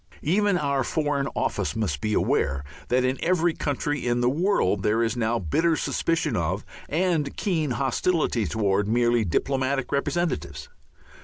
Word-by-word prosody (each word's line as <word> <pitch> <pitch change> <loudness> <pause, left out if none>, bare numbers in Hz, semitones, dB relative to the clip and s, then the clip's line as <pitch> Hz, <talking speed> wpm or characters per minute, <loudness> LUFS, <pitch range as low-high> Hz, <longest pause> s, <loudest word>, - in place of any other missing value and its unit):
Even 200 +4 +2
our 140 -4 0
Foreign 145 0 -1
Office - - -1
must 90 -11 -2
be 105 -1 0
aware 70 +1 +1 0.2
that 125 +1 +2
in 130 +1 -1
every 175 -1 +2
country 145 -2 -2
in 120 0 +1
the 120 +1 +2
world 155 - +1
there 110 +3 +2
is 115 +1 0
now 115 0 0
bitter 160 - +1
suspicion 160 -4 0
of 85 -6 -1 0.2
and 160 -3 0
keen 165 -7 0
hostility 130 - 0
towards 100 -1 0
merely 120 0 +3
diplomatic 135 +7 -1
representatives. 85 - -2
130 Hz, 145 wpm, -25 LUFS, 110-160 Hz, 0.2 s, merely